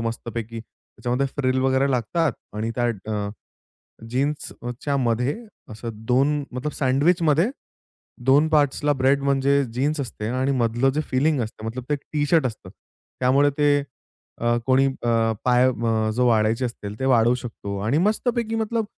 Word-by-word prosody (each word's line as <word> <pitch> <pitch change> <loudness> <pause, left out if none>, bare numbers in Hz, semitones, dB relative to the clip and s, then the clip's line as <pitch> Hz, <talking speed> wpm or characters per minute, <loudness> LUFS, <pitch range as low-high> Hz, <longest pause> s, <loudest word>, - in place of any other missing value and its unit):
मस्तपैकी. 115 0 -4
त्याच्यामध्ये 125 +3 -4
फ्रिल 130 -2 +1
वगैरे 135 +1 +2
लागतात 135 +5 0 0.2
आणि 110 +2 -2
त्या 120 - +1 0.3
अ, 105 -1 -2 0.8
जीन्सच्या 135 0 -2
मध्ये, 125 +1 0 0.4
असं 115 +2 -6 0.2
दोन 140 +4 +2
मतलब 130 +4 -3
सँडविचमध्ये 155 - +2 0.8
दोन 145 +4 +5
पार्ट्सला 145 -1 +2
ब्रेड, 135 +1 +2
म्हणजे 140 0 +2
जीन्स 145 +4 0
असते 115 -5 -5
आणि 130 +3 0
मधलं 120 +3 +2
जे 155 - +1
फीलिन्ग 140 +1 +2
असतं, 110 0 -10
मतलब 120 +3 -5
ते 150 - +2
एक 145 - -6
टी-शर्ट 150 0 +2
असतं. 115 - -7 0.5
त्यामुळे 135 +3 +4
ते 145 -1 +4 0.6
अ, 120 0 +2
कोणी 130 +1 +4
अ, 115 -4 +1
पाय 125 0 +4
अ, 115 -3 0
जो 125 +2 +2
वाढायचे 115 +2 +2
असतील, 105 -3 -6
ते - - -1
वाढवू 120 -2 +4
शकतो. 100 -4 -6
आणि 135 +7 +2
मस्तपैकी 235 0 -1
मतलब 225 0 -1
130 Hz, 145 wpm, -23 LUFS, 115-145 Hz, 0.8 s, दोन